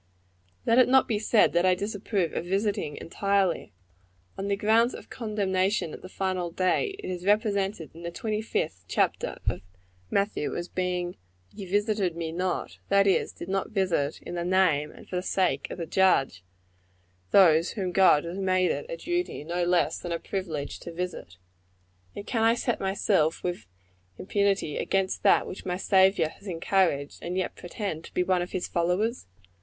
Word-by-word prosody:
Let 230 Hz, +2 st, +4 dB
it 255 Hz, -, +5 dB
not 265 Hz, 0 st, +5 dB
be 215 Hz, -3 st, 0 dB
said 220 Hz, 0 st, +3 dB
that 175 Hz, +1 st, +3 dB
I 185 Hz, -1 st, +4 dB
disapprove 200 Hz, -2 st, -2 dB
of -, -, -2 dB
visiting, 195 Hz, -5 st, -1 dB
entirely. 195 Hz, -, 0 dB, 0.6 s
One 195 Hz, -, -5 dB
of -, -, -2 dB
the 200 Hz, -, +2 dB
grounds 225 Hz, +4 st, +3 dB
of -, -, -12 dB
condemnation 200 Hz, -6 st, 0 dB
at -, -, -9 dB
the 185 Hz, -, -10 dB
final 185 Hz, -2 st, -2 dB
day, 185 Hz, -, 0 dB
is 180 Hz, -1 st, -4 dB
represented 200 Hz, -4 st, 0 dB
in 165 Hz, -, -12 dB
the 170 Hz, -, -4 dB
twenty 215 Hz, +4 st, -3 dB
fifth 155 Hz, -, -2 dB
chapter -, -, 0 dB
of 90 Hz, -, 0 dB, 0.5 s
Matthew, 200 Hz, -6 st, 0 dB
as 175 Hz, -, -4 dB
being 180 Hz, -1 st, -2 dB, 0.4 s
"Ye 195 Hz, -, -8 dB
visited 205 Hz, -2 st, 0 dB
me 165 Hz, -1 st, -3 dB
not;" 180 Hz, +2 st, -3 dB
that 200 Hz, 0 st, +5 dB
is, 195 Hz, -, +2 dB
did 170 Hz, -, -9 dB
not 195 Hz, 0 st, -1 dB
visit 185 Hz, -9 st, 0 dB
in -, -, -7 dB
the 175 Hz, -1 st, -2 dB
name 175 Hz, -5 st, +2 dB
and -, -, -14 dB
for 180 Hz, -, -3 dB
the -, -, 0 dB
sake 180 Hz, -7 st, 0 dB
of -, -, -6 dB
the 170 Hz, -, -3 dB
Judge, 155 Hz, -, +2 dB, 0.9 s
those 170 Hz, -3 st, +5 dB
whom 190 Hz, -4 st, -2 dB
God 180 Hz, -5 st, +5 dB
has 170 Hz, +3 st, -5 dB
made 185 Hz, -1 st, +2 dB
it -, -, -4 dB
a -, -, -4 dB
duty 350 Hz, -, -2 dB
no 175 Hz, +3 st, -2 dB
less 175 Hz, 0 st, +2 dB
than 175 Hz, -, -6 dB
a 170 Hz, -, 0 dB
privilege 165 Hz, -7 st, -4 dB
to 170 Hz, -, -8 dB
visit. 170 Hz, -, -5 dB, 0.8 s
And 200 Hz, -, -6 dB
can 230 Hz, -, -1 dB
I 225 Hz, +1 st, +4 dB
set 240 Hz, 0 st, -1 dB
myself, 190 Hz, -4 st, +1 dB
with 175 Hz, -, -3 dB, 0.5 s
impunity, 200 Hz, -5 st, 0 dB
against 195 Hz, -1 st, 0 dB
that -, -, +4 dB
which 185 Hz, -, -8 dB
my 180 Hz, 0 st, -2 dB
Saviour 190 Hz, -4 st, +3 dB
has 200 Hz, -, -15 dB
encouraged, 165 Hz, -5 st, 0 dB
and 180 Hz, +2 st, -3 dB
yet 185 Hz, -, -2 dB
pretend 175 Hz, -3 st, -5 dB
to -, -, -13 dB
be 180 Hz, -, +3 dB
one 180 Hz, -1 st, +1 dB
of 175 Hz, -, -5 dB
his 185 Hz, -, -2 dB
followers? 180 Hz, -, 0 dB
185 Hz, 180 wpm, -27 LUFS, 170-200 Hz, 0.9 s, it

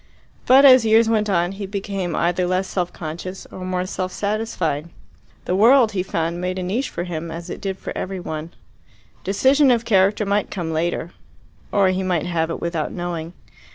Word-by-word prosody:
But 270 Hz, +2 st, +7 dB
as 255 Hz, -3 st, +8 dB
years 225 Hz, +1 st, +4 dB
went 215 Hz, -2 st, +1 dB
on 175 Hz, -2 st, +1 dB
he 195 Hz, 0 st, -6 dB
became 195 Hz, -3 st, -3 dB
either 175 Hz, +1 st, +1 dB
less 185 Hz, +1 st, 0 dB
self 180 Hz, -2 st, -2 dB
conscious 175 Hz, +4 st, -7 dB
or 185 Hz, -, -8 dB
more 185 Hz, 0 st, -2 dB
self 185 Hz, -1 st, -4 dB
satisfied. 185 Hz, -8 st, -2 dB, 0.6 s
The 180 Hz, -, 0 dB
world, 230 Hz, +3 st, +5 dB
he 195 Hz, -3 st, -1 dB
found, 170 Hz, -1 st, -2 dB
made 185 Hz, +1 st, -2 dB
a 185 Hz, -, -3 dB
niche 215 Hz, +10 st, -1 dB
for 175 Hz, -, -4 dB
him 170 Hz, -2 st, -5 dB
as 170 Hz, +2 st, -7 dB
it -, -, -7 dB
did 190 Hz, -1 st, -3 dB
for -, -, -7 dB
every 190 Hz, 0 st, -4 dB
one. 160 Hz, -2 st, -5 dB, 0.7 s
Decision 265 Hz, +8 st, +3 dB
of 235 Hz, -2 st, +2 dB
character 200 Hz, 0 st, +3 dB
might 205 Hz, +1 st, 0 dB
come 170 Hz, -4 st, -4 dB
later 170 Hz, +1 st, -2 dB, 0.6 s
or 195 Hz, -2 st, +3 dB
he 185 Hz, +1 st, 0 dB
might 180 Hz, -4 st, 0 dB
have 165 Hz, -2 st, -1 dB
it 165 Hz, -, -4 dB
without 170 Hz, -3 st, -2 dB
knowing. 175 Hz, -2 st, -5 dB
185 Hz, 190 wpm, -21 LUFS, 170-205 Hz, 0.7 s, as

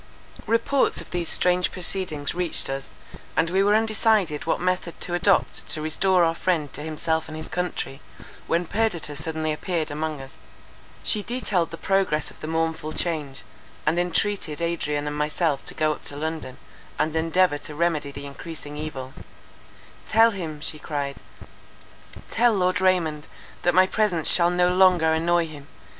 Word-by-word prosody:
Reports 230 Hz, +4 st, +2 dB
of -, -, -7 dB
these 175 Hz, -2 st, -2 dB
strange 180 Hz, 0 st, +2 dB
proceedings 175 Hz, -5 st, -2 dB
reached 175 Hz, -5 st, 0 dB
us, 135 Hz, 0 st, -5 dB, 0.5 s
and 165 Hz, +1 st, +2 dB
we 190 Hz, +1 st, +3 dB
were 205 Hz, +1 st, +4 dB
undecided 215 Hz, -7 st, +2 dB
what -, -, +1 dB
method 180 Hz, -1 st, -1 dB
to 175 Hz, -, -4 dB
adopt 190 Hz, +2 st, +2 dB
to -, -, -2 dB
restore 180 Hz, +4 st, +2 dB
our 165 Hz, 0 st, +3 dB
friend 160 Hz, -4 st, -1 dB
to 145 Hz, -, -4 dB
himself 160 Hz, +1 st, -1 dB
and 155 Hz, 0 st, -7 dB
his 155 Hz, -, -6 dB
country, 160 Hz, -5 st, -3 dB, 0.5 s
when 170 Hz, +1 st, +1 dB
Perdita 175 Hz, -7 st, -1 dB
suddenly 155 Hz, +1 st, -2 dB
appeared 160 Hz, 0 st, -2 dB
among 155 Hz, 0 st, -3 dB
us. 135 Hz, 0 st, -11 dB, 0.7 s
She 210 Hz, -, +1 dB
detailed 205 Hz, -7 st, 0 dB
the 165 Hz, -, -7 dB
progress 190 Hz, -5 st, +1 dB
of -, -, -17 dB
the 155 Hz, -, -6 dB
mournful 160 Hz, -1 st, -1 dB
change, 150 Hz, -6 st, -3 dB, 0.4 s
and 160 Hz, +3 st, +2 dB
entreated 175 Hz, -2 st, 0 dB
Adrian 155 Hz, -3 st, -1 dB
and 150 Hz, 0 st, -3 dB
myself 150 Hz, 0 st, 0 dB
to -, -, -5 dB
go 155 Hz, 0 st, +2 dB
up 150 Hz, -, -6 dB
to 145 Hz, -, -6 dB
London, 155 Hz, -3 st, -4 dB, 0.4 s
and 155 Hz, +1 st, 0 dB
endeavour 165 Hz, -1 st, +2 dB
to 150 Hz, +1 st, -8 dB
remedy 160 Hz, -3 st, +1 dB
the 140 Hz, 0 st, -8 dB
encreasing 150 Hz, +1 st, -8 dB
evil:—"Tell 155 Hz, -, -2 dB
him," 160 Hz, -7 st, -5 dB
she 155 Hz, 0 st, -5 dB
cried, 140 Hz, -3 st, -3 dB, 1.1 s
"tell 240 Hz, 0 st, +3 dB
Lord 185 Hz, 0 st, +1 dB
Raymond, 165 Hz, -5 st, +2 dB, 0.3 s
that 175 Hz, 0 st, +2 dB
my 185 Hz, 0 st, +7 dB
presence 190 Hz, -5 st, +1 dB
shall 170 Hz, -1 st, +4 dB
no 180 Hz, 0 st, +3 dB
longer 180 Hz, -4 st, +5 dB
annoy 170 Hz, +1 st, +2 dB
him. 145 Hz, -3 st, -10 dB
165 Hz, 160 wpm, -25 LUFS, 150-180 Hz, 1.1 s, my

